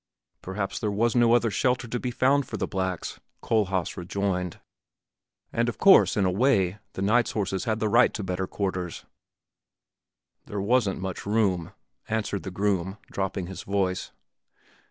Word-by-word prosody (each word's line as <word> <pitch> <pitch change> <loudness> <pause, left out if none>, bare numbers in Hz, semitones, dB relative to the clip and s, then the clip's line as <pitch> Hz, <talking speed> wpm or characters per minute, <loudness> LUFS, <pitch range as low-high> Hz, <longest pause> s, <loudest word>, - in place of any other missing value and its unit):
"Perhaps 95 +1 -3
there 105 - -1
was 110 +4 +1
no 120 -1 +5
other 115 -2 +2
shelter 125 +4 +1
to 120 +1 -3
be 125 - -2
found 135 +3 +2
for - - -5
the - - -1
blacks," 95 -3 -3 0.2
Kohlhaas 95 -5 0
rejoined; 90 -1 -2 0.9
"and 120 +1 +1
of 120 - -5
course, 195 - +6
in 100 - +3
a 90 - +2
way, 100 -3 +2
the 95 - -3
knights' 115 +4 +2
horses 95 -1 -2
had 110 -2 0
the 110 - +1
right 120 +3 +5
to 105 - -3
better 95 0 -2
quarters." 90 -4 -3 1.4
"There 105 - -4
wasn't 105 -1 +1
much 95 +1 -5
room," 100 -6 +1 0.4
answered 105 -3 -1
the 95 - -6
groom, 95 0 -1
dropping 95 -1 -2
his 95 +1 -7
voice. 95 -2 -1
100 Hz, 155 wpm, -26 LUFS, 95-115 Hz, 1.4 s, course